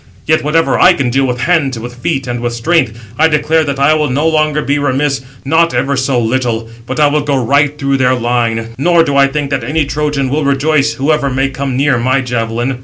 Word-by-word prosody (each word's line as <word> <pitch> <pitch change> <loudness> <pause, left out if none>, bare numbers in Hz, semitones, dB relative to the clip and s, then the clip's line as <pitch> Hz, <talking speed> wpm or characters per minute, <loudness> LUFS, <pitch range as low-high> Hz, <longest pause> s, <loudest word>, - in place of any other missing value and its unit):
Yet 155 0 +1
whatever 165 +3 +1
I 185 - +6
can 140 -8 -1
do 135 +2 +1
with 125 -2 -3
hands, 150 -7 +1
with 120 +2 -7
feet, 135 +2 -3
and 120 -1 -4
with 120 0 -3
strength, 120 -2 0 0.2
I 160 - +5
declare 160 +1 +1
that 140 -1 -3
I 140 +3 +3
will 150 -2 0
no 145 +5 0
longer 155 -1 +1
be 145 +1 0
remiss, 140 0 0 0.2
not 165 +4 +2
ever 140 +1 0
so 130 -1 0
little; 115 -1 -1 0.2
but 130 - -4
I 150 - +5
will 150 +1 +1
go 145 -1 -1
right 140 +4 +1
through 140 -1 0
their 130 -1 +2
line, 115 -2 -1
nor 170 +3 +3
do 145 -3 -2
I 140 0 +5
think 140 0 -3
that 135 -3 -1
any 150 +5 0
Trojan 145 -2 -2
will 150 +3 -1
rejoice, 140 +1 +1
whoever 140 0 0
may 135 +1 0
come 135 -1 -4
near 135 -2 +2
my 130 +3 +1
javelin." 120 +1 -3
140 Hz, 225 wpm, -13 LUFS, 125-150 Hz, 0.2 s, I